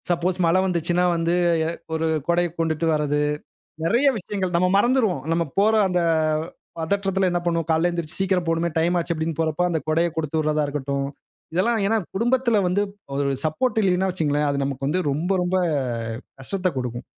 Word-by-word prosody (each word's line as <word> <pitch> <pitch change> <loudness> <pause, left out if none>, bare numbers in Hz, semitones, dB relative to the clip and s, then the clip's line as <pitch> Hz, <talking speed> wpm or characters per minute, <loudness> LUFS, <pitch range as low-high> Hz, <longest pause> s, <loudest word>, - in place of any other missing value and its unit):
Suppose 175 +1 0
மழ 165 +2 +3
வந்துச்சுன்னா 175 -1 +1
வந்து, 165 0 0 0.3
எ - - 0 0.2
ஒரு 160 0 0 0.2
கொடைய 175 0 +2
கொண்டுட்டு 160 0 0
வரது. 150 -1 0 0.7
நெறைய 235 +11 +3
விஷயங்கள், 185 -2 -3
நம்ம 180 +1 +3
மறந்துருவோம். 220 - +2
நம்ம 170 0 +1
போற 215 +2 +4
அந்த 180 -1 +1 0.8
பதற்றத்தில 195 +3 0
என்ன 175 0 0
பண்ணுவோம், 165 -1 0
"காலையில 160 +2 +3
எழுந்திரிச்சு 170 -3 -2
சீக்கிரம் 185 -2 +1
போணுமே! 165 +1 +1
டைம் 170 +2 +2
ஆச்சு." 170 0 -2
அப்பிடீன்னு 160 -1 -3
போறப்ப, 160 +1 0
அந்த 165 - 0
கொடையக் 165 +1 +1
குடுத்து 160 -1 -1
விடுறதா 155 0 +1
இருக்கட்டும். 140 -1 -2 0.5
இதெல்லாம் 225 +5 +2
ஏன்னா, 225 +2 +2 0.2
குடும்பத்தில 235 +1 +2
வந்து 190 +3 +1 0.3
ஒரு 140 0 0
சப்போர்ட் 220 - 0
இல்லயின்னா 190 0 +2
வச்சுக்கங்களேன், 150 -4 0
அது 140 0 -1
நமக்கு 135 0 -3
வந்து 180 +5 0
ரொம்ப, 160 +6 -2
ரொம்ப 180 +1 0 0.8
கஷ்டத்தைக் 185 +3 -2
குடுக்கும். 120 -1 -4
170 Hz, 165 wpm, -23 LUFS, 155-185 Hz, 0.8 s, போற